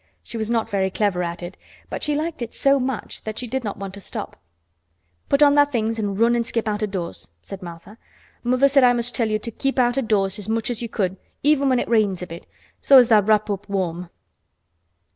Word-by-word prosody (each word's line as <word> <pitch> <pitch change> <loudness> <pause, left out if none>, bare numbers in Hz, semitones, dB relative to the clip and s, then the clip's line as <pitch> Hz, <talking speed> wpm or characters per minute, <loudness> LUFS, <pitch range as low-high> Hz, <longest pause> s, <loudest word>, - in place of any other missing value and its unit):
She - - -10
was 220 -1 -2
not 230 -2 0
very 195 -3 0
clever 195 -2 0
at 170 0 -4
it, 175 +2 -8 0.3
but - - -4
she 295 - 0
liked 315 -1 -3
it 235 - -5
so 275 0 +3
much 255 -3 -4
that 220 0 -6
she 250 - -2
did 260 +2 -3
not 205 -3 -4
want 195 -1 -7
to 200 - -9
stop. - - -6 0.9
"Put 280 +1 +4
on 285 -1 +6
tha' 290 0 +6
things 225 -4 -1
and 200 -2 -2
run 235 +2 +3
an' 235 - +1
skip 230 -1 -2
out 210 0 -1
o' 215 - 0
doors," 170 - -6
said 195 0 -8
Martha. 175 +5 -11 0.4
"Mother 255 +3 +3
said 275 -1 +4
I 245 -1 +6
must 240 0 -2
tell 230 -3 0
you 215 - +1
to 230 +2 -6
keep 270 +5 -2
out 245 +1 +3
o' - - +1
doors 205 -3 +1
as 210 - -3
much 225 +1 0
as 235 - -3
you 235 - -4
could, 190 -4 -2 0.3
even 285 -1 +3
when 255 - +3
it - - -1
rains 205 -6 +1
a - - -3
bit, 170 -1 -10 0.3
so 275 - +7
as 245 -2 +6
tha' 215 -2 +6
wrap 215 +1 +2
up 200 +1 -5
warm." 180 -3 -2
220 Hz, 240 wpm, -22 LUFS, 195-245 Hz, 0.9 s, so